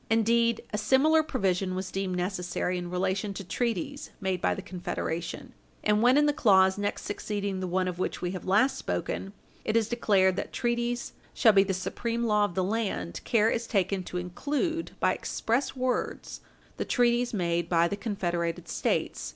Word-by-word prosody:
Indeed, 230 +1 +3
a 210 - 0
similar 280 +8 +4
provision 195 - -1
was 185 0 -4
deemed 195 -1 -2
necessary 180 0 -2
in 175 0 -5
relation 190 +2 -1
to 195 - -5
treaties 235 - -2
made 190 -3 -1
by - - +1
the 195 - -7
Confederation; 180 - -4 0.3
and 210 0 +3
when, 250 +3 +5
in 295 - +5
the 295 - +3
clause 190 -8 +5
next 205 0 -2
succeeding 205 -2 -3
the 185 - -3
one 185 +1 0
of 180 -1 -4
which - - -2
we 180 - -2
have 185 - -6
last 215 +8 +3
spoken, 195 - -3 0.3
it 220 - +1
is 225 -2 +2
declared 195 -6 +2
that - - -3
treaties 240 0 -1 0.2
shall 225 -4 +6
be 195 - +7
the 190 -1 -1
supreme 235 +5 -2
law 210 -2 +3
of 175 - -6
the 185 - +1
land, 205 -3 -2
care 225 -1 +3
is 230 0 -2
taken 195 -2 +1
to 180 - -5
include, 290 - -2
by - - +3
express 240 +6 -1
words, 255 -1 -2 0.4
the - - -1
treaties 240 0 +2
made 170 -4 -1
by 170 -1 +4
the 200 - -2
confederated 175 -6 -2
States. - - -1
205 Hz, 180 wpm, -28 LUFS, 185-235 Hz, 0.4 s, be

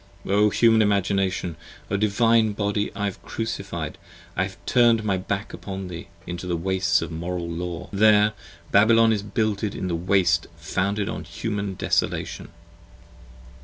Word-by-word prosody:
Human 105 +3 +4
Imagination, 95 -4 0 0.3
O - - +2
Divine 110 +1 +3
Body 105 0 -1
I 100 - -2
have 100 -2 -4
Crucified, 100 -8 -4 0.3
1 95 - +1
have 95 - -15
turned 120 -3 +4
my 100 -3 +1
back 100 +2 -3
upon 95 -1 -6
thee 85 -2 -7 0.2
into 90 +1 -5
the 85 -1 0
Wastes 90 -1 +1
of 85 - -6
Moral 85 +1 -4
Law: 85 0 -4
25 100 - -5
There 105 0 +5 0.4
Babylon 115 +2 +5
is 105 - -1
builded 105 0 -1
in 95 - -3
the 85 - 0
Waste, 90 +2 +2
founded 100 +1 -1
in - - -4
Human 100 -3 -3
desolation. - - -1
100 Hz, 145 wpm, -24 LUFS, 90-105 Hz, 0.4 s, There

